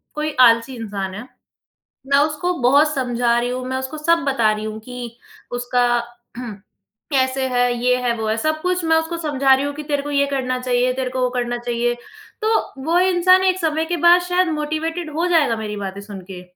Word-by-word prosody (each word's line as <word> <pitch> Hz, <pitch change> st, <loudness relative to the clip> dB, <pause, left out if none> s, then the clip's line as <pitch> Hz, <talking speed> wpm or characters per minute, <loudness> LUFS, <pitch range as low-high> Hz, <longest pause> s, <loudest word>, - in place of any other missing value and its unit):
कोई 305 Hz, 0 st, -2 dB
आलसी 235 Hz, +1 st, +5 dB
इंसान 200 Hz, -4 st, -5 dB
है, 225 Hz, +5 st, -8 dB, 0.8 s
मैं 280 Hz, 0 st, +3 dB
उसको 305 Hz, +4 st, +1 dB
बहुत 290 Hz, +5 st, +4 dB
समझा 245 Hz, -2 st, +1 dB
रही 240 Hz, +1 st, -1 dB
हूँ, 255 Hz, 0 st, -4 dB
मैं 260 Hz, -, -2 dB
उसको 260 Hz, +4 st, -5 dB
सब 335 Hz, +2 st, +3 dB
बता 235 Hz, -6 st, +2 dB
रही 215 Hz, 0 st, -4 dB
हूँ 215 Hz, 0 st, -5 dB
कि 240 Hz, 0 st, -8 dB, 0.4 s
उसका 245 Hz, 0 st, +1 dB, 1.1 s
कैसे 260 Hz, 0 st, +1 dB
है, 245 Hz, -1 st, +1 dB
ये 250 Hz, 0 st, +4 dB
है 240 Hz, -, +1 dB
वो 220 Hz, -, -3 dB
है 220 Hz, -, +1 dB
सब 310 Hz, +5 st, -1 dB
कुछ 360 Hz, -1 st, -1 dB
मैं 320 Hz, 0 st, +3 dB
उसको 325 Hz, +1 st, -2 dB
समझा 280 Hz, -4 st, +2 dB
रही 270 Hz, +2 st, +1 dB
हूँ 285 Hz, -, -3 dB
कि 300 Hz, -, -6 dB
तेरे 290 Hz, -1 st, -1 dB
को 290 Hz, +1 st, -6 dB
ये 280 Hz, 0 st, +2 dB
करना 255 Hz, -2 st, -1 dB
चाहिए, 250 Hz, 0 st, +1 dB
तेरे 260 Hz, -1 st, -3 dB
को 255 Hz, 0 st, -3 dB
वो 250 Hz, -, +2 dB
करना 240 Hz, 0 st, -1 dB
चाहिए। 240 Hz, 0 st, -1 dB, 0.5 s
तो 440 Hz, +1 st, +2 dB, 0.3 s
वो 335 Hz, +2 st, +2 dB
इंसान 370 Hz, 0 st, +4 dB
एक 375 Hz, 0 st, +2 dB
समय 320 Hz, -1 st, 0 dB
के 345 Hz, +1 st, -2 dB
बाद 345 Hz, +2 st, +6 dB
शायद 360 Hz, 0 st, +1 dB
मोटिवेटेड 315 Hz, +2 st, -3 dB
हो 335 Hz, +3 st, 0 dB
जाएगा 310 Hz, -9 st, +3 dB
मेरी 210 Hz, -1 st, -5 dB
बातें 200 Hz, 0 st, -5 dB
सुन 200 Hz, -2 st, -9 dB
के। 180 Hz, -1 st, -8 dB
265 Hz, 205 wpm, -20 LUFS, 240-315 Hz, 1.1 s, बाद